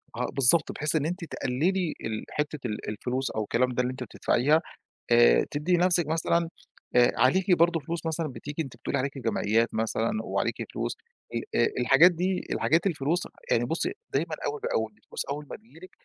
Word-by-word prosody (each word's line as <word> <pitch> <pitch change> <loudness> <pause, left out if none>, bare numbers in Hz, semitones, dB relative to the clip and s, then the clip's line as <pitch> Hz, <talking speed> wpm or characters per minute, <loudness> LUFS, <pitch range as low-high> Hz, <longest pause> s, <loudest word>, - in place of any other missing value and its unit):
آه - - -1
بالضبط، 140 +5 +4
بحيث 150 +1 -1
إن 150 -1 +1
أنتِ 175 +2 -3
تقلّلي 165 +6 -1
ال 110 -1 -3
حِتّة 150 0 -3
ال 105 -1 -5
الفلوس 125 +5 -2
أو 110 - -2
الكلام 125 +4 +1
ده 125 - +1
اللي 125 - -1
أنتِ 130 0 -6
بتدفَعيها 135 +6 +2 0.5
آآ، - - +6
تدّي 160 +5 +1
نفسِك 175 -2 +3
مثلًا، 165 +1 +1 0.5
آآ، 120 0 +6
عليكِ 180 - +3
برضه 170 -1 +3
فلوس 165 +3 -5
مثلًا 160 0 -1
بتيجي 145 +4 -5
أنتِ 130 -5 -10
بتقولي 130 +3 -2
عليكِ 135 +1 -3
جمعيّات 115 -1 +1
مثلًا 110 0 0
وعليكِ - - -1 0.2
فلوس - - -2 0.4
ال - - -1 0.2
آآ - - +4
الحاجات 180 +2 +7
دي، 180 +2 -1
الحاجات 165 +4 +2
الفلوس، 160 0 0 0.2
يعني 120 - +3
بُصّي 165 - -1 0.2
دايمًا - - 0
أول 435 0 -3
بأول، 485 +1 -1
الفلوس 465 - -6
أول 145 +1 -4
ما - - -5
تيجي 215 -6 -19
لِك 185 +2 -12
150 Hz, 185 wpm, -27 LUFS, 125-175 Hz, 0.5 s, الحاجات